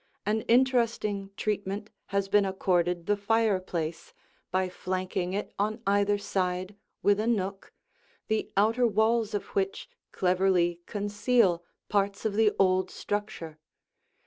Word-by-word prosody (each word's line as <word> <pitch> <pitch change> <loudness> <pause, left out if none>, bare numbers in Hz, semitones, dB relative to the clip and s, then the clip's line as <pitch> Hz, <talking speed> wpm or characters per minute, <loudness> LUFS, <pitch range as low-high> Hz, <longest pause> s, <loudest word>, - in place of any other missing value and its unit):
An 215 +2 +1
interesting 230 -5 +2
treatment 205 0 -2 0.2
has 200 0 0
been 205 +1 +4
accorded 180 -3 0
the 205 - +2
fireplace 195 -6 -1 0.3
by 185 0 +1
flanking 185 0 -3
it 205 - -3
on 215 +2 0
either 200 +1 +3
side 185 -1 -2 0.3
with 205 0 +4
a 220 - 0
nook, 195 -4 -1 0.6
the 220 0 -1
outer 225 +4 +4
walls 220 0 +2
of 205 - -2
which 195 0 -2 0.2
cleverly 180 -2 +2
conceal 205 -3 +1 0.2
parts 200 +1 0
of 215 - +1
the 215 0 +4
old 185 -1 +3
structure. 190 -7 -4
200 Hz, 120 wpm, -28 LUFS, 185-215 Hz, 0.6 s, been